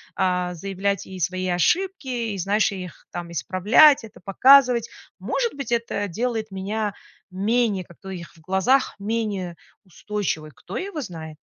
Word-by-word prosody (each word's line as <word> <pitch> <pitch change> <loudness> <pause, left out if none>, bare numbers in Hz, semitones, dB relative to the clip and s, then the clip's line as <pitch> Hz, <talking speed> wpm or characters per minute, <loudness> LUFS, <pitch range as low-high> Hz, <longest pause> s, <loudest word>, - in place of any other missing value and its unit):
а, 180 -2 0
заявлять 195 +2 -2
и 190 -1 -9
свои 185 +2 -1
ошибки, 345 - +1 0.3
и, - - -5
знаешь, 200 +4 +2
их 180 -2 -8
там 175 -1 -5
исправлять, 200 - +5
это 220 -1 -12
показывать. 250 +2 +6 0.3
Может 475 -2 -1
быть, 275 -5 -6
это 230 -3 -1
делает 220 +3 -2
меня 205 +2 -3 0.4
менее 205 +1 +1
как-то 175 +3 -15
у - - -5
их 175 -2 -8
в - - -19
глазах 190 - +2
менее 200 -4 -2 0.3
устойчивой, 185 -4 -3
кто - - -8
его 385 -4 -4
знает. 160 - -8
200 Hz, 145 wpm, -23 LUFS, 180-230 Hz, 0.4 s, показывать